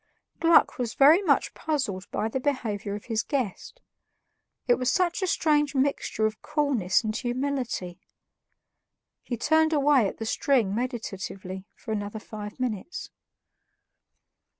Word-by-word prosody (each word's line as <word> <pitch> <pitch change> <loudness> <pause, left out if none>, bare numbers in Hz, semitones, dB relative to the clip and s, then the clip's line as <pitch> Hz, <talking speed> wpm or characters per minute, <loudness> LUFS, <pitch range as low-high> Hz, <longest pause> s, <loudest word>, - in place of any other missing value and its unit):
Gluck 330 -4 +4
was 235 -3 -2
very 305 +7 +7
much 395 - +2
puzzled 255 - -2
by 220 - -1
the 245 +4 -2
behavior 220 -7 -2
of 205 - -8
his 225 -3 0
guest; 275 - -4 0.8
it 245 - +5
was 255 0 +1
such 360 0 +1
a 375 - 0
strange 295 -4 +2
mixture 265 -5 0
of 215 0 -2
coolness 280 - +1
and 215 -1 -2
humility. 245 -7 -2 1.2
He 240 - -4
turned 315 +5 +3
away 285 -6 +4
at - - -6
the 225 - -5
string 230 -4 +1
meditatively 195 -5 -5
for 225 - -8
another 205 0 -3
five 210 +1 -8
minutes. 250 - -4
245 Hz, 130 wpm, -27 LUFS, 210-285 Hz, 1.2 s, very